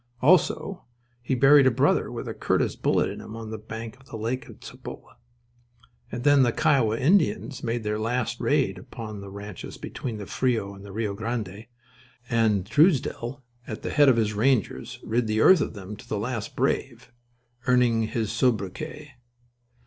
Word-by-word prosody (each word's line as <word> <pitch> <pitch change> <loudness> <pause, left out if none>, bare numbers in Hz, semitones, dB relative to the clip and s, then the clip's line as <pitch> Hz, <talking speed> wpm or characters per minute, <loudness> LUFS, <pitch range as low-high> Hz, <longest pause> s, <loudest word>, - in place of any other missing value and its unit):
Also 180 +5 +2 0.4
he 120 +2 -1
buried 135 +2 +6
a - - +7
brother 130 +4 +2
with - - -6
a - - -3
Curtis - - 0
bullet - - +1
in - - -6
him 110 - -9
on 110 -1 -7
the 110 - -5
bank 110 +2 -7
of 135 - -21
the 115 - -7
lake 115 +4 -3
at - - -14
Cibolo. - - -10 1.0
And 120 +2 -4
then 145 -1 +6
the 120 -2 +4
Kiowa 130 -8 +2
Indians 150 -3 +1
made 115 -1 -2
their 105 0 -1
last 120 +1 -1
raid 130 -11 +1
upon 105 +1 -8
the 100 - -9
ranches 100 -1 -8
between 115 -4 -5
the 105 - -6
Frio 115 -4 -1
and 100 0 -12
the 100 - -10
Rio 105 0 -2
Grande, 110 -1 -4 0.6
and 110 -5 +2
Truesdell 135 - +2 0.2
at 110 - -6
the - - -3
head 145 -2 +6
of 125 - +4
his 110 -2 +1
rangers 115 +1 0
rid 115 +1 0
the 110 0 0
earth 185 -4 +7
of - - -3
them 100 +1 -7
to - - -14
the 105 - -1
last 115 0 -4
brave, 125 -2 -1 0.6
earning 120 -3 +3
his 110 -2 -2
sobriquet. 115 +5 -1
115 Hz, 175 wpm, -26 LUFS, 105-130 Hz, 1.0 s, a